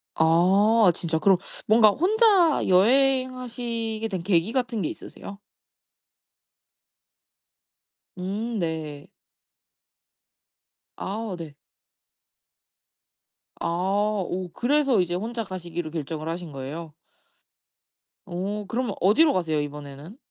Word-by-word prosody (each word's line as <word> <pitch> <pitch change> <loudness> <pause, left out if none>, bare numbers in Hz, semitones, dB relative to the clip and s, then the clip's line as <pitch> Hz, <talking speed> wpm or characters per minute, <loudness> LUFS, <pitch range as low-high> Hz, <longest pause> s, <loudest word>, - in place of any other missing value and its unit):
아. 190 +6 +4
진짜 165 -2 -2
그럼 190 +3 +4 0.3
뭔가 215 0 +6
혼자 370 - +3
여행하시게 240 0 +1
된 185 -3 -3
계기 185 +1 +2
같은 245 -3 -1
게 160 - -1
있으세요? 200 0 -10 2.8
음 210 +5 -3
네. 155 -4 -4 1.9
아 205 0 -4
네. 155 -4 -9 2.0
아. - - -2 0.6
오 180 0 -4
그래서 270 -4 +2
이제 175 -1 -2
혼자 225 +5 -3
가시기로 175 -4 -6
결정을 155 0 -4
하신 170 -1 -5
거예요? 145 +4 -7 1.3
오. 195 +3 -4
그러면 235 -1 -2
어디로 280 - +5
가세요 160 -4 0
이번에는? 145 - -8
195 Hz, 185 characters per minute, -25 LUFS, 165-235 Hz, 2.8 s, 뭔가